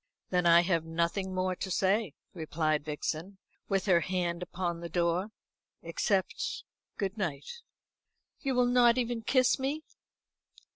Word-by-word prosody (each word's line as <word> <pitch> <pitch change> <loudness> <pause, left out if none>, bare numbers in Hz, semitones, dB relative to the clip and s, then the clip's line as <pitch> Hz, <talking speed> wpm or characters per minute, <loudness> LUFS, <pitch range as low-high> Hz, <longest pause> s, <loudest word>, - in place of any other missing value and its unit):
"Then 180 -1 +2
I 170 0 +8
have 170 -2 +1
nothing 170 +4 -1
more 185 0 -1
to 190 - -4
say," 195 -1 +1 0.2
replied 155 -2 -1
Vixen, 155 +5 -4 0.3
with 195 -2 +1
her 180 -4 +5
hand 175 -1 -2
upon 175 -1 -3
the 170 0 -6
door, 175 +3 0 0.5
"except 205 - -1 0.3
good 200 +1 -3
night." 180 - -4 0.8
"You 270 -2 -1
will 250 0 +4
not 245 -1 +5
even 240 -2 -1
kiss 255 +3 +3
me?" 285 +4 -2
185 Hz, 135 wpm, -30 LUFS, 170-225 Hz, 0.8 s, I